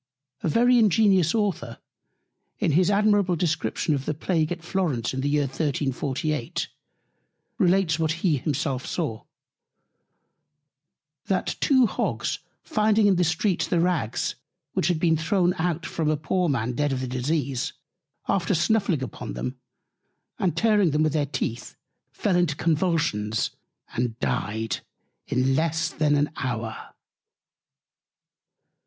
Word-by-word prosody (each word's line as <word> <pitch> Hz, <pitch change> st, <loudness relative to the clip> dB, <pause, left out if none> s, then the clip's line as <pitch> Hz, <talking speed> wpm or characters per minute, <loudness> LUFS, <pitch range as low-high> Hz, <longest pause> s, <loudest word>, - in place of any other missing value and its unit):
A -, -, 0 dB
very 245 Hz, +7 st, +4 dB
ingenious 200 Hz, -5 st, +4 dB
Author 180 Hz, -, -1 dB, 0.8 s
in -, -, +1 dB
his 175 Hz, +5 st, +3 dB
admirable 205 Hz, -3 st, +3 dB
Description 160 Hz, -1 st, 0 dB
of 135 Hz, -2 st, -2 dB
the 155 Hz, -, -1 dB
Plague 160 Hz, 0 st, 0 dB
at 175 Hz, -1 st, -4 dB
Florence 170 Hz, -12 st, -1 dB
in 130 Hz, -, -2 dB
the 145 Hz, -, 0 dB
Year 145 Hz, 0 st, +2 dB
1348, 140 Hz, +1 st, -2 dB, 0.9 s
relates 180 Hz, -4 st, +3 dB
what 160 Hz, -1 st, +1 dB
himself 150 Hz, -5 st, -1 dB
saw: 145 Hz, -11 st, -3 dB, 2.0 s
That 190 Hz, -, 0 dB
two 260 Hz, -3 st, +4 dB
Hogs -, -, -1 dB, 0.2 s
finding 215 Hz, -6 st, +2 dB
in 195 Hz, -3 st, +4 dB
the 180 Hz, -, +3 dB
Streets 175 Hz, +3 st, +1 dB
the 175 Hz, -, +1 dB
Rags, 165 Hz, -10 st, 0 dB, 0.4 s
which -, -, +1 dB
had 175 Hz, -3 st, +1 dB
been 165 Hz, -1 st, +3 dB
thrown 175 Hz, +2 st, +2 dB
out 170 Hz, 0 st, -1 dB
from 160 Hz, -2 st, -1 dB
off 155 Hz, -, +2 dB
a -, -, -8 dB
poor 175 Hz, +3 st, 0 dB
Man 125 Hz, -4 st, 0 dB
dead 145 Hz, +3 st, 0 dB
of 130 Hz, -1 st, -1 dB
the 130 Hz, -, -3 dB
Disease, 135 Hz, +2 st, -1 dB, 0.5 s
after 190 Hz, 0 st, +1 dB
snuffling 180 Hz, -, +1 dB
upon 110 Hz, -, -6 dB
them, 60 Hz, +1 st, -5 dB, 0.8 s
and 185 Hz, -3 st, 0 dB
tearing 210 Hz, -5 st, +4 dB
them 150 Hz, +1 st, +2 dB
with 155 Hz, -2 st, +1 dB
their 150 Hz, -2 st, +1 dB
Teeth, 120 Hz, -4 st, -4 dB, 0.4 s
fell 200 Hz, -3 st, 0 dB
into 175 Hz, -5 st, +2 dB
Convulsions, 155 Hz, -, 0 dB, 0.4 s
and 120 Hz, -2 st, -1 dB
dyed 110 Hz, -1 st, -1 dB, 0.5 s
in 130 Hz, +1 st, +1 dB
less 165 Hz, +1 st, +1 dB
than 150 Hz, -1 st, +2 dB
an 145 Hz, +1 st, +1 dB
Hour. 115 Hz, -3 st, -4 dB
160 Hz, 135 wpm, -25 LUFS, 135-180 Hz, 2.0 s, very